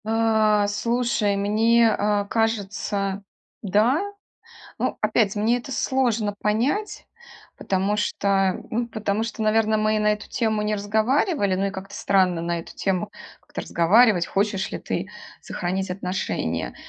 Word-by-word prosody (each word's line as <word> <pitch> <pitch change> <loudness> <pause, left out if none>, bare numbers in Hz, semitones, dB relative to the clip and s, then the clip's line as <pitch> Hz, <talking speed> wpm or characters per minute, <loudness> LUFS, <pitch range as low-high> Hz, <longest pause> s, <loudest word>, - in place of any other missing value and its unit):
Э, 220 -2 +2
слушай, 225 0 0
мне, 225 +3 +3
а, 205 -1 0
кажется, 200 -2 -1 0.4
да. 215 - +2 0.8
Ну, - - -1
опять, 215 -1 +2
мне 220 +4 +1
это 270 +2 -8
сложно 235 -6 0
понять, 260 - -1 0.5
потому 195 +2 0
что, 195 -2 0
ну, 235 +2 -1
потому 220 -1 -2
что, 230 -1 -5
наверно, 215 0 +2
мы 215 0 +1
и - - +1
на 210 0 +3
эту 210 0 -6
тему 220 -2 0
не 210 0 0
разговаривали. 215 - +1
Ну, 195 +1 0
и - - -1
как-то 195 0 -8
странно 185 -4 +2
на 170 0 -2
эту - - -13
тему 195 +1 -1 0.3
как-то - - -7
разговаривать- 185 +1 +4
"хочешь 195 -1 -1
ли - - -4
ты - - -4 0.3
сохранить 185 +2 -3
отношения". 180 - -3
210 Hz, 140 wpm, -23 LUFS, 195-225 Hz, 0.8 s, разговаривать